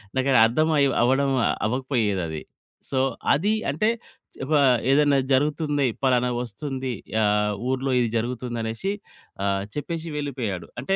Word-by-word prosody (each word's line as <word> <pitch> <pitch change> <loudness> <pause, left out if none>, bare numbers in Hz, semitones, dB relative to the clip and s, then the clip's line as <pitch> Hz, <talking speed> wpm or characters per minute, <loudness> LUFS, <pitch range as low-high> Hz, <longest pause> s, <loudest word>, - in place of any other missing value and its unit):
నాకు 130 +1 +1 0.2
అర్థం 155 +8 +1
అయి 140 -1 +4
అవ్వడం 135 +3 +3 0.4
అవ్వకపోయేది 115 -5 0
అది. 80 -1 -5 0.5
సో, 130 - 0 0.3
అది 200 +10 +1 0.2
అంటే 160 +11 +1 0.6
ఒక 155 - -2 0.4
ఏదైనా 145 0 +4
జరుగుతుంది. 145 +1 +1 0.2
పలానా 125 -1 +3
వస్తుంది. 130 +3 -4 0.3
ఆ! - - +3 0.5
ఊర్లో 130 +1 -1
ఇది 120 -2 +1
జరుగుతుంది 120 +1 -3
అనేసి 115 - -3 0.5
ఆహ్, 100 0 0
చెప్పేషి 165 +2 -4
వెళ్ళిపోయాడు. 120 - -4
అంటే 195 +8 0
130 Hz, 125 wpm, -24 LUFS, 120-145 Hz, 0.6 s, అయి